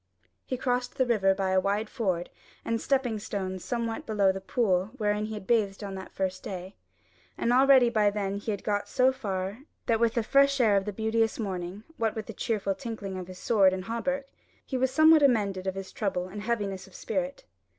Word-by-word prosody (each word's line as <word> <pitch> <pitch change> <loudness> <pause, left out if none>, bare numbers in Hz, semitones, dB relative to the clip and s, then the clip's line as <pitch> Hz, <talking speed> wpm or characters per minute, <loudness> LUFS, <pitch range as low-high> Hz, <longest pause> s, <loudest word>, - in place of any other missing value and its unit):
He 255 - -2
crossed 250 0 -1
the 260 - +3
river 195 -5 +3
by 190 -1 -1
a 190 - +4
wide 205 +3 0
ford 185 -8 -2 0.3
and 230 0 -1
stepping 255 -5 0
stones 190 -3 -4
somewhat 230 -2 -3
below 205 -3 +3
the 190 0 -6
pool 190 -3 +1
wherein 210 -2 0
he 215 0 -5
had 210 - -8
bathed 210 -2 +1
on 200 -1 -5
that 190 0 -8
first 185 -1 -2
day; 185 0 -7 0.6
and 235 - +1
already 265 -1 +6
by 215 -3 +3
then 200 -1 -2
he 205 - -6
had 205 -2 -2
got 205 -1 -1
so 255 +1 +4
far, 200 -5 -4 0.3
what 225 -2 +2
with 230 -1 +2
the 235 - +1
fresh 275 +3 +4
air 220 -5 +4
of 195 -1 +1
the 210 - -2
beauteous 220 +2 0
morning, 190 -1 -4
what 225 -1 0
with 220 -2 -4
the 225 - -7
cheerful 205 -2 -1
tinkling 215 -4 -6
of 185 -1 -6
his 185 -1 -10
sword 195 -3 +4
and 185 0 -4
hauberk, 270 +5 -2 0.4
he 265 - -4
was 260 0 +2
somewhat 315 +3 +6
amended 200 -8 +2
of 190 - -1
his 195 0 -6
trouble 185 -4 -2
and 205 +2 -7
heaviness 205 -4 -2
of 190 - -17
spirit. 275 0 -3
210 Hz, 210 wpm, -28 LUFS, 195-235 Hz, 0.6 s, already